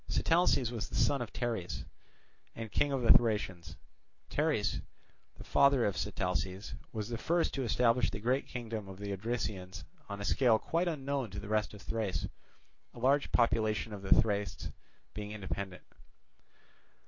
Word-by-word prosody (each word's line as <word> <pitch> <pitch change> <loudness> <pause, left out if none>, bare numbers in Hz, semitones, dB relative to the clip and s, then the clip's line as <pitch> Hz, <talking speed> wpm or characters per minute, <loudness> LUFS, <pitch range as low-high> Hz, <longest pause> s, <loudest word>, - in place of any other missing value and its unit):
Sitalces 165 -8 +3
was 110 -6 -4
the - - -6
son 140 -3 +3
of 115 -4 -4
Teres 110 -9 -3 0.7
and 115 -2 -6
King 145 +8 +2
of 135 -2 0
the 115 - +7
Thracians. 95 -8 +2 0.5
Teres, - - +1 0.6
the - - -9
father 140 -3 +4
of 100 - 0
Sitalces, 95 -1 -2 0.2
was 110 0 -4
the 115 -1 -3
first 170 0 +1
to 135 - -1
establish 120 +1 +3
the 110 - -5
great 125 +5 +1
kingdom 115 -4 -5
of 95 -1 -9
the 100 0 -4
Odrysians 100 -3 -3 0.3
on 100 0 -5
a 100 - -4
scale 120 -2 +4
quite 170 +9 0
unknown 140 -6 -1
to 100 - -6
the 100 - -8
rest 105 -1 0
of 100 - -12
Thrace, 110 -4 -2 0.7
a - - -12
large 140 +4 +3
portion 110 -2 +2
of 100 - -6
the 95 - +5
Thracians 100 -4 -1 0.4
being 105 0 -5
independent. 95 -1 -5
110 Hz, 160 wpm, -33 LUFS, 100-125 Hz, 0.7 s, the